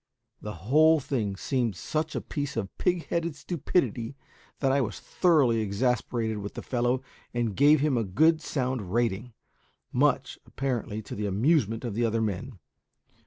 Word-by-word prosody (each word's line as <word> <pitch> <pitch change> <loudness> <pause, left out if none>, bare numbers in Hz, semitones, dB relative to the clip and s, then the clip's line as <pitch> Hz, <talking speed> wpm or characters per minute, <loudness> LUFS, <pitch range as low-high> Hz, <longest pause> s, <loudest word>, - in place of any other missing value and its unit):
The 105 -1 -6
whole 155 +6 +5
thing 115 -8 -2
seemed 115 +3 -1
such 155 - -3
a - - -1
piece 145 -4 -4
of 100 -4 -3
pig 180 -2 +1
headed 170 -2 -1
stupidity 145 -6 -1 0.4
that 135 -2 +1
I 140 +1 +3
was 105 -6 -3
thoroughly 145 -11 +3
exasperated 110 +1 0
with 100 0 -6
the - - -6
fellow, 125 +1 0 0.3
and 115 -4 0
gave 145 +1 +5
him 145 -5 +2
a - - 0
good 155 - +3
sound 125 - -2
rating; 115 +1 0 0.6
much, - - +1
apparently, 120 -5 -3
to - - -8
the 105 0 -2
amusement 115 - +1
of 115 - -3
the 120 +3 0
other 115 0 +1
men. 110 +3 -3
120 Hz, 160 wpm, -28 LUFS, 110-145 Hz, 0.6 s, whole